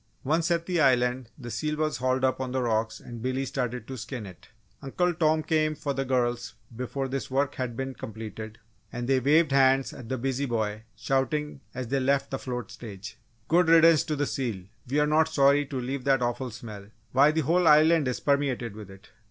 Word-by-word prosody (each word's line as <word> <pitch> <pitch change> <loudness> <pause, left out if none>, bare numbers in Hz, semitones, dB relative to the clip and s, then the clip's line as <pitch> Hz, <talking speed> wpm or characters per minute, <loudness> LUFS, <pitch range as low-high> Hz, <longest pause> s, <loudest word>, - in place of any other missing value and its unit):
Once 160 +5 +1
at 170 -1 +1
the 175 -2 0
Island 125 -2 +2
the 120 -4 -8
seal 150 +4 -2
was 155 0 -1
hauled 130 +1 0
up 130 0 +1
on 130 -1 -3
the 130 0 0
rocks 110 -1 -1
and 120 -2 -9
Billy 130 +2 -1
started 125 -2 -3
in - - -27
to 130 +1 -7
skin 120 -1 -6
it. 90 -2 -13 0.3
Uncle 175 +6 0
Tom 155 -1 +2
came 155 -1 +1
for 145 -1 -3
the 135 0 -1
girls 120 -3 -1 0.2
before 130 +3 -3
this 135 +1 -4
work 140 +2 0
had 125 -3 -4
been 135 0 -3
completed 110 -1 -8 0.3
and 120 0 -4
they 135 -1 +3
waved 150 +4 +3
hands 135 0 +3
at 120 -3 -10
the 130 - -1
busy 135 +2 -1
boy, 110 -3 -2
shouting 135 +2 -1
as 125 -2 -5
they 135 +1 +1
left 135 +1 +1
the 135 - -2
float 125 -3 -5
stage: 110 -2 -9 0.3
"Good 175 +1 +3
riddance 165 -1 +6
to 155 - -2
the 145 0 0
seal! 115 -10 -3 0.3
We're 150 +3 +2
not 155 +2 +3
sorry 140 -1 +3
to 135 -2 -4
leave 130 +2 -4
that 135 -2 +3
awful 120 +2 -2
smell. 105 -3 -9 0.2
Why, 140 +3 +5
the 160 +1 +1
whole 170 +4 +2
Island 155 0 +5
is 125 - -2
permeated 135 -6 0
with 105 -3 -10
it!" 95 0 -15
130 Hz, 210 wpm, -27 LUFS, 120-150 Hz, 0.3 s, riddance